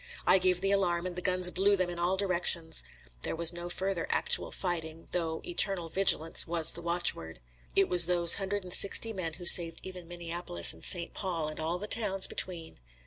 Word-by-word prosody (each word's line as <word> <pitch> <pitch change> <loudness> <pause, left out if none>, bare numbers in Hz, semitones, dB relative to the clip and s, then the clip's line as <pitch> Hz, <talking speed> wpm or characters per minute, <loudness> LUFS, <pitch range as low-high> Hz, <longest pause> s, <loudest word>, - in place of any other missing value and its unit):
I 185 +2 +4
gave 180 -1 -1
the 195 0 -2
alarm, 180 -3 -2
and 180 -1 -7
the 180 - -7
guns 180 -1 0
blew 195 +3 +1
them 185 -2 -3
in 175 - -9
all 180 +2 -2
directions. 175 -4 -1 0.4
There - - -5
was 170 +1 0
no 175 0 -9
further 185 -1 -5
actual - - -1
fighting, 165 -3 -7
though 165 -2 -5
eternal 175 -1 -2
vigilance 170 -4 +3
was 165 -1 +2
the 170 - -5
watchword. 170 - -2 0.4
It 195 -1 +2
was 175 -2 +5
those 175 -1 +4
hundred 195 +1 -5
and 180 -1 -4
sixty 225 +3 +2
men 175 -5 -6
who 175 - -13
saved 170 -1 +6
even 180 -2 -11
Minneapolis 170 - +1
and 80 - -14
St. 170 -1 0
Paul, 170 -5 -5
and 155 - -10
all 160 +2 -4
the 200 - -7
towns 205 -3 +4
between. 170 -3 -4
175 Hz, 195 wpm, -27 LUFS, 165-185 Hz, 0.4 s, saved